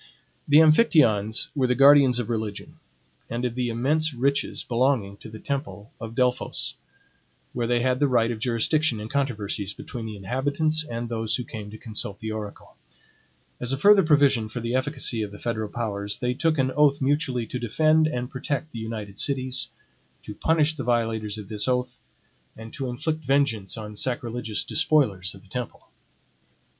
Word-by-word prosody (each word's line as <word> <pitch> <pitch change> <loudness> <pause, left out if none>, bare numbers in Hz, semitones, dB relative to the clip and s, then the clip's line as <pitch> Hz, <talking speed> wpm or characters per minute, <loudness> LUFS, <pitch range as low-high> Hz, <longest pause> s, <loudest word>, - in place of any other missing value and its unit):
The 145 - +6
Amphictyons 155 - +4
were 130 -3 +2
the 125 - +2
guardians 140 -2 +6
of 120 -3 -2
religion, 110 -3 -4 0.5
and 120 +2 -2
of 120 - -1
the 125 0 -1
immense 145 +6 0
riches 140 +3 0
belonging 120 -5 +1
to 110 - -11
the 110 - -9
temple 135 -4 -5
of 115 0 -7
Delphos, 125 0 0 0.8
where 120 -1 -1
they 120 0 +2
had 130 0 +1
the 145 - +3
right 120 -3 +2
of 115 - -5
jurisdiction 120 +3 +1
in 105 +1 -6
controversies 105 -7 -2
between 115 -2 -7
the 110 - -6
inhabitants 145 +9 +1
and 120 -4 -5
those 110 -2 -1
who 125 - -3
came 110 -3 -8
to 110 - -9
consult 105 -3 -6
the 110 +1 -5
oracle. 105 -2 -7 0.8
As 125 +2 -2
a - - 0
further 200 +6 +6
provision 140 - +3
for 120 - -5
the 115 +1 -3
efficacy 130 -3 -1
of 105 -2 -4
the 105 - -10
federal 110 -2 -3
powers, 100 -3 -2
they 125 0 -1
took 155 +4 +1
an 130 -1 +1
oath 145 +1 +3
mutually 135 -3 0
to 125 - -5
defend 155 +7 +3
and 125 -5 -3
protect 140 +3 -4
the 115 - -7
united 110 -3 -6
cities, 130 -2 -1 0.6
to 105 - -7
punish 160 +6 +2
the 135 - -4
violators 115 -3 -1
of 105 -2 -8
this 105 +2 -3
oath, 125 -1 -1 0.6
and 110 0 -10
to 135 -2 -4
inflict 155 +5 -3
vengeance 130 -8 +1
on 105 -1 -7
sacrilegious 120 -1 -3
despoilers 100 - +1
of 95 - -15
the - - -19
temple. 125 +3 -6
125 Hz, 175 wpm, -25 LUFS, 110-140 Hz, 0.8 s, The